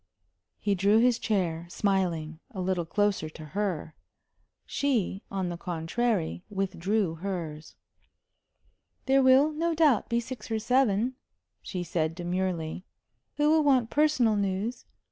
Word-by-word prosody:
He 205 - 0
drew 200 +3 +3
his 245 +1 +4
chair, 175 -6 -1
smiling, 175 -5 -1
a 215 -8 -8
little 180 -2 -1
closer 205 -5 0
to 155 0 -10
her. 185 -6 -2 0.7
She, 230 -9 0
on 190 -2 -2
the 175 - -4
contrary, 175 +2 -1
withdrew 195 -2 -1
hers. 165 -6 -5 1.3
"There 270 0 +4
will, 265 +3 +5
no 330 +2 -1
doubt, 305 -7 +3
be 235 0 +2
six 235 -1 -7
or 225 - 0
seven," 250 0 +1 0.4
she 180 -2 -4
said, 165 -2 -1
demurely, 175 -1 -2 0.5
"who 295 +1 +3
will 315 -1 +4
want 260 -5 +3
personal 285 -7 +3
news. 200 +4 -2
200 Hz, 125 wpm, -28 LUFS, 175-245 Hz, 1.3 s, will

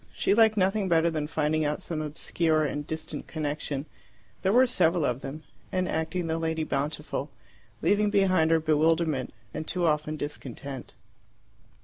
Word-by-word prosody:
She 195 - +2
liked 220 0 +5
nothing 195 +1 +2
better 165 0 +4
than 155 -2 -2
finding 155 0 0
out 150 0 -1
some 160 -2 -3
obscure 155 +1 0
and 145 +1 -3
distant 160 0 -5
connection 150 -2 -3 0.6
there 190 - +2
were 250 +4 +6
several 175 - +2
of 125 0 -1
them 150 +3 -7 0.3
and 185 -1 0
acting 165 +2 -1
the 165 0 -1
lady 160 -1 -1
bountiful, 150 0 -2 0.5
leaving 205 +1 +3
behind 185 -5 +3
her 165 0 +4
bewilderment, 155 -2 +2 0.2
and 155 0 -5
too 180 -1 0
often 155 -1 +1
discontent. 140 -2 -7
160 Hz, 150 wpm, -28 LUFS, 150-180 Hz, 0.6 s, were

